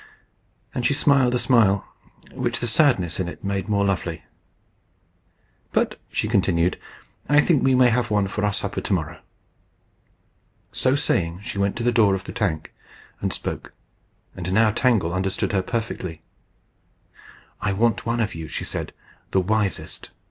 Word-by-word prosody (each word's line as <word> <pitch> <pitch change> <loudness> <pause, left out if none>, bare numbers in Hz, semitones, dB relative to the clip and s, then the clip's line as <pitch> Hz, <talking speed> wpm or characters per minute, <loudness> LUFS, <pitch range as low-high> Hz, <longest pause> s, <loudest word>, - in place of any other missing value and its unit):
And 125 - -2
she 140 - +2
smiled 135 -4 +3
a - - +3
smile 105 -6 +3 0.5
which 120 -2 -2
the - - -2
sadness 110 - +2
in 90 - -1
it 90 - -8
made 100 0 -2
more 100 -1 +2
lovely. 90 -4 -2 1.5
"But," - - +1
she - - -1
continued, 90 -5 +2 0.5
"I 145 0 +6
think 150 -1 +3
we 130 -1 +4
may 125 -1 +6
have 120 +1 +1
one 105 -2 +2
for 105 +1 -1
supper - - -3
to - - -1
morrow." - - -2 1.5
So 130 +1 +1
saying 85 -9 0
she 100 - -5
went 100 0 +1
to 120 - -3
the 120 - +3
door 105 -5 +4
of 95 - -5
the - - -7
tank, 80 -8 -2 0.5
and - - -1
spoke; - - -5 0.6
and 90 0 -4
now 110 +2 +4
Tangle 110 -7 +2
understood 95 +1 -1
her 95 -2 +2
perfectly. 95 -6 -4 1.4
"I - - 0
want 110 +2 +1
one 115 0 0
of 105 - -1
you," 80 -1 -6
she - - -4
said, - - -4 0.4
"the 95 - +2
wisest." 105 0 -2
105 Hz, 155 wpm, -23 LUFS, 95-120 Hz, 1.5 s, I